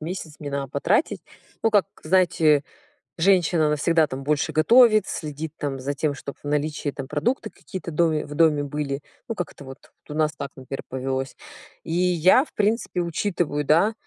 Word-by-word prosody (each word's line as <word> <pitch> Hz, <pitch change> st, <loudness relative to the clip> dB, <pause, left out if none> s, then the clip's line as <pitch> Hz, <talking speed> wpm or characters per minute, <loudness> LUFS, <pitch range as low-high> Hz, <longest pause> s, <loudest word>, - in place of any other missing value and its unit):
месяц 165 Hz, -3 st, -5 dB
мне 145 Hz, -2 st, -5 dB
надо 140 Hz, -1 st, -3 dB
потратить. 170 Hz, -, 0 dB, 0.4 s
Ну, 225 Hz, -, +3 dB
как 205 Hz, -3 st, +4 dB, 0.2 s
знаете, 160 Hz, -4 st, +3 dB, 0.5 s
женщина, 170 Hz, -3 st, +3 dB
она 150 Hz, -, +2 dB
всегда 160 Hz, +1 st, +2 dB
там 135 Hz, 0 st, -6 dB
больше 150 Hz, +1 st, 0 dB
готовит, 220 Hz, +6 st, +5 dB
следит 155 Hz, 0 st, -5 dB
там 140 Hz, -3 st, -3 dB
за 140 Hz, +2 st, -2 dB
тем, 145 Hz, +1 st, -1 dB
чтобы 140 Hz, 0 st, -8 dB
в -, -, -8 dB
наличии 150 Hz, 0 st, -1 dB
там 135 Hz, -1 st, -7 dB
продукты 155 Hz, -, -1 dB
какие-то 180 Hz, -2 st, -8 dB
в -, -, -9 dB
доме 160 Hz, -2 st, +2 dB
в 145 Hz, -, -8 dB
доме 150 Hz, -2 st, +3 dB
были. 145 Hz, -1 st, -3 dB, 0.3 s
Ну, 230 Hz, -, -3 dB
как-то 165 Hz, -6 st, -6 dB
вот, 135 Hz, +4 st, -12 dB, 0.2 s
у -, -, -5 dB
нас 155 Hz, 0 st, +1 dB
так, 140 Hz, -, -5 dB
например, 135 Hz, 0 st, -7 dB
повелось. 130 Hz, 0 st, -3 dB, 0.5 s
И -, -, -7 dB
я, 180 Hz, -, +4 dB
в -, -, -22 dB
принципе, 210 Hz, -3 st, 0 dB
учитываю, 170 Hz, -4 st, -1 dB
да, 170 Hz, +10 st, +4 dB
155 Hz, 180 wpm, -24 LUFS, 145-180 Hz, 0.5 s, готовит